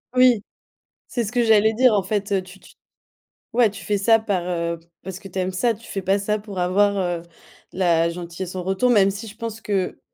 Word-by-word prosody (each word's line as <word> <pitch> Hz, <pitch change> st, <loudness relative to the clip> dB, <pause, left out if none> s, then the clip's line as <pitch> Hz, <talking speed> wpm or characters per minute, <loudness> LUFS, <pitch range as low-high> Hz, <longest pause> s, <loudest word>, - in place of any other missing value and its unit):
Oui, 250 Hz, -4 st, +5 dB, 0.7 s
c'est 240 Hz, -2 st, -2 dB
ce 215 Hz, -, -5 dB
que 245 Hz, -1 st, +2 dB
j'allais 220 Hz, 0 st, +4 dB
dire, 250 Hz, 0 st, +5 dB
en 200 Hz, -, +2 dB
fait. 200 Hz, 0 st, -1 dB
Tu 185 Hz, +1 st, -14 dB
tu -, -, -18 dB, 0.8 s
ouais, 235 Hz, -2 st, +4 dB
tu 205 Hz, +2 st, -10 dB
fais 205 Hz, -, 0 dB
ça 225 Hz, +3 st, +4 dB
par, 200 Hz, -5 st, -1 dB
heu, 170 Hz, -1 st, -2 dB, 0.2 s
parce 190 Hz, -1 st, -7 dB
que 200 Hz, -, -10 dB
tu 190 Hz, 0 st, -5 dB
aimes 185 Hz, 0 st, -1 dB
ça, 230 Hz, +6 st, +1 dB
tu 225 Hz, +1 st, -14 dB
fais 195 Hz, -, -4 dB
pas 195 Hz, +2 st, +2 dB
ça 210 Hz, +1 st, -1 dB
pour 205 Hz, -3 st, -7 dB
avoir, 200 Hz, +3 st, +2 dB
heu, 175 Hz, -3 st, -1 dB, 0.5 s
la 170 Hz, -3 st, +2 dB
gentillesse 175 Hz, +2 st, -6 dB
en 180 Hz, -, -3 dB
retour, 195 Hz, +7 st, +1 dB
même 200 Hz, -5 st, +5 dB
si 215 Hz, +3 st, -7 dB
je 210 Hz, -, -11 dB
pense 225 Hz, -1 st, -6 dB
que 195 Hz, -4 st, -2 dB
200 Hz, 220 wpm, -22 LUFS, 185-220 Hz, 0.8 s, Oui